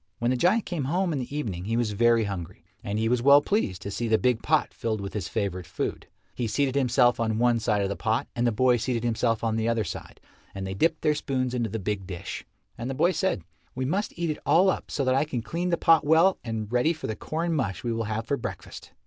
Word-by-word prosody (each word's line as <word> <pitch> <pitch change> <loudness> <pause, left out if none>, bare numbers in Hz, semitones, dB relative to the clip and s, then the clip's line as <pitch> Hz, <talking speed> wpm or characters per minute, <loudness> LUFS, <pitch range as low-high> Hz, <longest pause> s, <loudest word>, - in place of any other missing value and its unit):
When 120 +1 0
the - - +2
giant 185 - +2
came 165 -7 -3
home 175 +4 0
in 140 - -1
the 130 +3 -5
evening 95 -11 -3
he 115 +2 0
was 120 -3 0
very 115 +2 +3
hungry, 95 -5 -6 0.2
and 100 +1 -2
he 110 +1 +1
was 120 +1 +1
well 140 +3 +8
pleased 145 - -1
to 100 - -5
see 120 +3 -2
the 110 0 +4
big 125 -2 +1
pot - - +1
filled 110 -2 -2
with 100 0 -6
his 105 -6 -3
favourite 95 -6 -3
food. - - -4 0.3
He 120 - -2
seated 135 +3 0
himself 125 -3 +3
on 110 -1 0
one 120 0 +3
side 105 -2 +1
of 100 - -1
the 100 - -2
pot, 110 +2 -1
and 120 0 +1
the - - +3
boy 125 +2 +3
seated 120 0 -2
himself 115 -1 0
on 110 -1 0
the 110 +1 0
other 115 -2 +1
side, 90 - -7 0.4
and 95 0 -4
they 95 - -3
dipped 160 +11 +1
their 150 -1 +4
spoons 130 -4 -2
into 120 -3 -1
the 110 - -3
big 100 -2 -3
dish. 90 -3 -6 0.4
And 120 +2 -3
the 135 - -3
boy 175 +7 +3
said, 190 - -1 0.3
"We 130 0 -2
must 190 +9 -2
eat 170 -2 0
it 150 - -5
all 185 +3 +5
up - - -5
so 140 - -1
that 130 - +3
I 135 +2 +3
can 130 -6 -4
clean 170 +10 -2
the 170 - +1
pot 165 -1 +5
well 165 +5 +4
and 110 -2 -4
ready 125 +7 +3
for 160 - -8
the 110 - -2
corn 165 +7 -2
mush 100 - -2
we 120 - -1
will 115 0 -2
have 110 +1 -3
for 140 - 0
breakfast." 115 - -7
120 Hz, 260 wpm, -26 LUFS, 110-145 Hz, 0.4 s, well